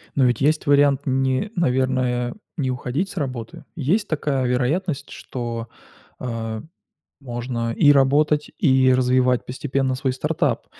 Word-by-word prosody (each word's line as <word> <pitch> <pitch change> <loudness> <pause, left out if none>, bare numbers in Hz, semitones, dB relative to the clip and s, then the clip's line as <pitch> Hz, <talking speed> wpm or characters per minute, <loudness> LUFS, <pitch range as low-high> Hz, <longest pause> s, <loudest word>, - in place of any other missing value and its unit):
Но 135 - +4
ведь 125 +1 +1
есть 150 +3 +2
вариант, 140 -1 +4
не, 130 +8 0
наверное, 130 -5 0 0.2
не 130 -5 0
уходить 130 +9 -2
с - - -11
работы. 130 -7 -5
Есть 175 +8 0
такая 145 -4 -1
вероятность, 140 +6 -1
что, 115 -2 -5 0.5
э, 115 -3 -4 0.6
можно 120 -2 -3
и 145 +4 +5
работать, 145 +2 +3
и 130 -3 +4
развивать 125 0 +2
постепенно 130 0 -1
свой 130 +1 -1
стартап. 130 - -1
130 Hz, 130 wpm, -22 LUFS, 125-145 Hz, 0.6 s, и